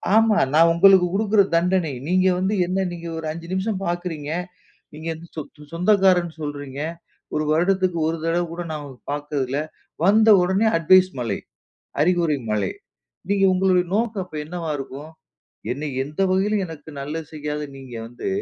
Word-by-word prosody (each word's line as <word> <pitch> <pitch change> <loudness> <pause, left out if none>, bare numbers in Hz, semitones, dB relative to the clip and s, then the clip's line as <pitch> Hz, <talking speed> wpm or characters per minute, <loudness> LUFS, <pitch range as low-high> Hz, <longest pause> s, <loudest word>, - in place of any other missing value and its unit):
ஆமா, 220 -1 +5 0.2
நான் 165 +2 +6
உங்களுக்கு 190 +1 +6
குடுக்கிற 210 0 +3
தண்டனை. 175 -1 +2 0.2
நீங்க 185 +1 +3
வந்து 190 +3 0
என்ன 185 +2 0
நீ 175 - -6 0.2
ஒரு 160 - -5
5 170 +1 -8
நிமிஷம் 190 +1 -1
பார்க்கிறீங்க. 170 -4 -3 0.6
நீங்க 155 +2 -6 0.3
சொ - - -3 0.2
சொ - - -15
சொந்தக்காரன்னு 180 -2 +3
சொல்கிறீங்க. 145 -2 -5 0.5
ஒரு 155 - +1
வருடத்திற்கு 180 +2 +2
ஒரு 165 +1 -1
தடவ 165 +1 +1
கூட 170 +1 -5
நான் 155 -1 -4
உங்கள 135 -3 -11
பார்த்ததில்ல. 145 -2 -2 0.4
வந்த 215 +4 +5
உடனே 190 +5 +2
அட்வைஸ் 185 +3 +5
மழை, 115 -5 -2 0.6
அறிவுரை 170 -2 +2
மழை. 105 -3 0 0.6
நீங்க 200 -1 +3
உங்களுடைய 185 -1 +3
நோக்கம் 220 -3 0
அப்ப 155 - -12
என்னவா 170 0 -5
இருக்கும்? 140 +2 -8 0.6
என்னைய 135 0 -3
எந்த 150 +6 -4
வகையிலும் 200 +1 +1
எனக்கு 160 -2 -10
நல்லது 155 +3 -5
செய்யாத 150 0 -3
நீங்க 130 -3 -10
வந்து 120 +9 -7
170 Hz, 150 wpm, -22 LUFS, 150-190 Hz, 0.6 s, நான்